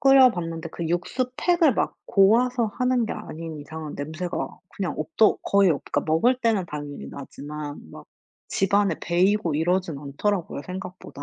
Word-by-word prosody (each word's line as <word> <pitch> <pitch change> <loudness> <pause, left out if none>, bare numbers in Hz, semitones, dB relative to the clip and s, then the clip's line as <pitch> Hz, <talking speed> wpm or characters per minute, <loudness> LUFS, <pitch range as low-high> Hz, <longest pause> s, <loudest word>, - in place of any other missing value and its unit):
끓여 270 -2 +7
봤는데 165 -4 -4
그 170 0 -4
육수 185 +9 -1
팩을 345 -7 +3
막 - - 0
고아서 235 +5 +4
하는 250 -2 +2
게 - - -3
아닌 165 -6 -7
이상은 155 +1 -7
냄새가 160 +5 -4 0.2
그냥 190 -3 -2
없더 225 -9 +3
거의 200 -2 +4
없 145 - 0
그니까 - - -1
먹을 165 +12 +3
때는 225 -6 +2
당연히 145 -2 -6
나지만 145 +1 -7
막 - - -12 0.4
집안에 200 +1 +2
배고 180 -1 +2
이러진 170 0 0
않더라고요 150 +3 -2
생각보다. 180 -5 -8
180 Hz, 335 characters per minute, -25 LUFS, 160-220 Hz, 0.4 s, 끓여